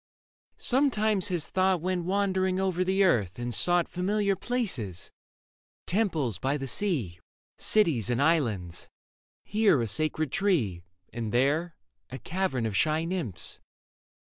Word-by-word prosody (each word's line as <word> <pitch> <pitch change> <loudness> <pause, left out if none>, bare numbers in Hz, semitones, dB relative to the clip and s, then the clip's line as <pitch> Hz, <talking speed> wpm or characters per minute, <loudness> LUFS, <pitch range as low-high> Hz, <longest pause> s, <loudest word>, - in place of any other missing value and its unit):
Sometimes 220 -7 +2
his 175 -5 -2
thought 185 -1 +2
Went 180 0 -2
wandering 190 -1 0
over 185 -2 0
the 190 +2 +2
earth 105 - +1
and 120 0 -4
sought 175 +4 +4
Familiar 200 +2 0
places 185 - -3 0.4
— - - -88
temples 160 - 0
by 135 +2 0
the 135 - -5
sea, 130 - -1 0.4
Cities 160 - +3
and 120 0 0
islands; 120 - 0 0.5
here 210 - +3
a 115 - -1
sacred 155 +4 -1
tree 135 - 0 0.3
And 115 -2 -4
there 150 +8 +1 0.3
a 130 - -6
cavern 175 -8 -2
of 110 -3 -2
shy 155 +6 +1
nymphs. 165 - -2
170 Hz, 130 wpm, -28 LUFS, 120-190 Hz, 0.5 s, sought